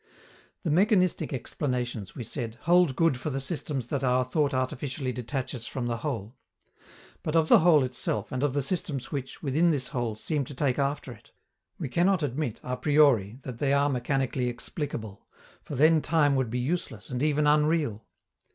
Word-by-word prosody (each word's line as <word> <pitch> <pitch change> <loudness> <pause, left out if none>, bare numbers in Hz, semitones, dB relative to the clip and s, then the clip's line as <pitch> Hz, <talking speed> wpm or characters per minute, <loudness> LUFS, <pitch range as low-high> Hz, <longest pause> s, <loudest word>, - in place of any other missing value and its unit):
The 165 - 0
mechanistic 185 +1 +3
explanations, 125 -6 -3
we 120 - -5
said, 115 -1 -5
hold 175 -5 +4
good 165 -6 +2
for 140 - -3
the 135 -1 -2
systems 135 -3 -2
that 140 -2 -2
our 125 0 +3
thought 145 +3 0
artificially 130 +1 -2
detaches 125 0 -4
from 130 -2 -4
the 120 -1 -1
whole. 115 -4 -4 0.9
But 155 - -3
of 160 -1 +3
the - - +8
whole 160 -4 +5
itself 125 -4 -2
and 130 - -2
of 145 -2 +1
the 145 - +1
systems 140 -5 -3
which, 135 -3 -5
within 155 +5 +3
this 140 -5 0
whole, 120 -3 -2
seem 145 +6 -2
to 140 - -9
take 135 -1 0
after 140 -1 -1
it, 105 -3 -14 0.5
we - - -3
cannot 175 +5 +2
admit 140 -3 -2
a 125 - -2
priori 135 -9 +3
that 125 -3 -7
they 140 -1 +2
are 140 +1 +3
mechanically 130 -1 0
explicable, 120 - -6 0.4
for 145 - -6
then 155 +3 +5
time 145 -4 +3
would 130 -3 0
be 120 - -2
useless, 125 -5 -3
and 125 0 -2
even 150 0 +2
unreal. 150 -6 +2
135 Hz, 180 wpm, -27 LUFS, 125-150 Hz, 0.9 s, the